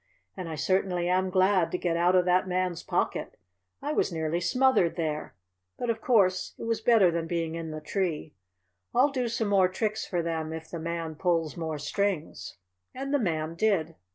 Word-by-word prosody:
"And 185 -3 -6
I 160 - -4
certainly 180 +2 0
am 185 +1 +2
glad 185 -1 +3
to - - 0
get 175 -2 -1
out 175 +2 +3
of 180 -1 +4
that 180 +1 +3
Man's 180 -2 -1
pocket. - - -2 0.5
I 295 +2 -1
was - - +1
nearly 160 0 -1
smothered 250 -3 +3
there, 155 -3 -3 0.4
but 240 -1 0
of 225 -1 -5
course 195 -7 +2
it - - -8
was 230 -1 -1
better 220 -6 +5
than 165 -1 -2
being 165 -1 -2
in 165 -1 -5
the 155 0 -6
tree. 165 -3 -2 0.6
I'll 270 +4 +5
do 255 -3 -1
some 225 -2 -1
more 195 -2 +5
tricks 215 +3 -2
for 175 -2 -1
them 160 -1 -3
if 160 0 -8
the 170 - -4
Man 165 -1 -3
pulls 165 -1 0
more 160 -2 -3
strings." 165 - -2 0.4
And 275 +2 -4
the 285 - +3
Man 160 -6 -1
did. 170 -3 +1
180 Hz, 190 wpm, -28 LUFS, 165-205 Hz, 0.6 s, better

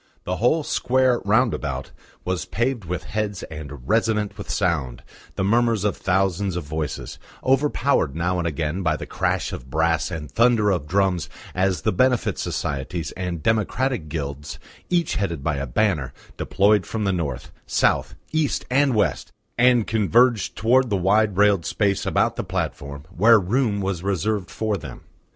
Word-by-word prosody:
The 90 +1 -2
whole 150 - +2
square 130 -2 +2
round 110 +3 +3
about 70 -3 -4 0.3
was 90 -2 -2
paved 120 -2 -1
with 90 +1 -4
heads 105 -3 -3
and 70 -4 -8
resonant 110 -2 +1
with 100 - -9
sound, 75 -9 -1 0.3
the - - -1
murmurs 115 0 +2
of 105 - +1
thousands 95 0 0
of 90 - -3
voices, 75 -1 -5 0.2
overpowered 135 - +2
now 90 +2 0
and 85 - -1
again 80 +3 -2
by 80 -4 +1
the - - -6
crash - - -1
of 65 - -8
brass 80 +3 +1
and 75 -5 -6
thunder 115 -3 +3
of 85 -6 -1
drums 95 -1 +1 0.2
as 95 0 0
the - - +2
Benefit 125 +5 +1
Societies 70 +3 -3
and 90 -4 -4
democratic 110 - 0
Guilds, 70 -2 -5 0.3
each 175 -2 +1
headed 85 -8 -2
by 75 -2 0
a 70 0 -3
banner, 75 - 0 0.2
deployed 100 0 +2
from 110 -1 -3
North, 85 -10 -2 0.2
South, - - +1 0.2
East 155 -3 0
and 135 -1 +3
West, 105 - 0 0.2
and 125 -2 +4
converged 115 +1 +2
towards 125 +4 +3
the 100 - +1
wide 100 +2 +2
railed 100 -3 +4
space 100 +1 0
about - - +1
the - - -2
platform 70 0 -4
where 110 +5 +6
room 105 +1 0
was 95 -3 -2
reserved 100 0 -1
for 110 -2 -2
them. 70 -8 -9
95 Hz, 160 wpm, -23 LUFS, 80-110 Hz, 0.3 s, where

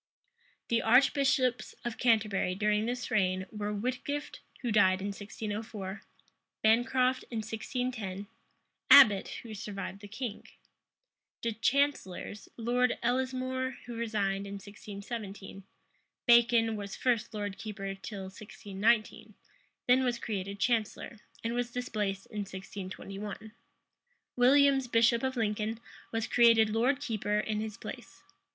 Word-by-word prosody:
The 230 -1 +2
archbishops 260 +1 +3
of 240 -1 -4
Canterbury 215 -6 +2
during 210 +2 +1
this 245 -1 -3
reign 185 -3 +1
were 210 -1 -3
Whitgift, 255 +7 -3 0.2
who 240 - 0
died 190 -3 +4
in 200 +2 -3
1604; 205 0 -6 0.6
Bancroft, 250 +3 +3
in 230 - -4
1610; 220 -3 -4 0.6
Abbot, 210 -9 +8 0.2
who 225 -2 -8
survived 195 -1 -6
the 205 - -9
king. 220 +1 -6 1.0
The 230 - 0
chancellors, 225 -4 -1
Lord 245 +2 +1
Ellesmore, 260 +1 -1
who 240 - -7
resigned 200 -4 -1
in 200 - -6
1617; 200 0 -8 0.6
Bacon 235 -1 +5
was 200 -1 -6
first 235 -3 0
lord 205 -2 -4
keeper 195 -3 -5
till 195 +1 -7
1619; 205 +3 -1 0.5
then 255 +1 +5
was 245 -2 0
created 200 -3 -4
chancellor, 225 0 -1 0.2
and 230 +1 -1
was 240 0 -1
displaced 210 -6 -3
in 210 - -7
1621: 195 +2 -7 0.8
Williams, 270 +1 +5
bishop 235 0 +4
of 260 -1 -2
Lincoln, 220 0 -1 0.3
was 225 -1 -1
created 230 -2 +5
lord 245 +5 +2
keeper 215 -6 -1
in 210 0 -1
his 215 -1 -5
place. - - -9
220 Hz, 120 wpm, -31 LUFS, 200-245 Hz, 1.0 s, Abbot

